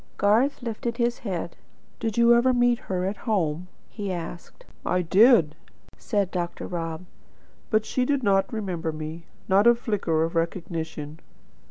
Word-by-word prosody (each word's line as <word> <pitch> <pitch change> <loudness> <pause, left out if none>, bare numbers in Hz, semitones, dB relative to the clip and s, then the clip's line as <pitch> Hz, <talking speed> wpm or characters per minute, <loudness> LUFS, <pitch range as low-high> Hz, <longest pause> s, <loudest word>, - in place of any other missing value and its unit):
Garth 235 +7 +2
lifted 235 0 -3
his 240 -1 0
head. 180 -6 -4 0.4
"Did 225 -1 -3
you 235 0 +6
ever 245 +2 +4
meet 245 -1 +3
her 185 -1 -1
at 195 +1 -2
home?" 175 -4 0 0.2
he 205 -3 -5
asked. 175 - -7 0.2
"I 180 0 0
did," 195 - +5 0.4
said 200 -3 -1
Dr. 175 -2 -3
Rob. 165 -1 -4 0.6
"But 215 -1 +2
she 255 - 0
did 275 0 0
not 195 -2 +2
remember 180 -7 -3
me. 155 +2 -7 0.2
Not 200 +4 +4
a 235 - +7
flicker 200 -9 0
of 165 - -2
recognition. 165 -2 -3
195 Hz, 150 wpm, -25 LUFS, 165-235 Hz, 0.6 s, a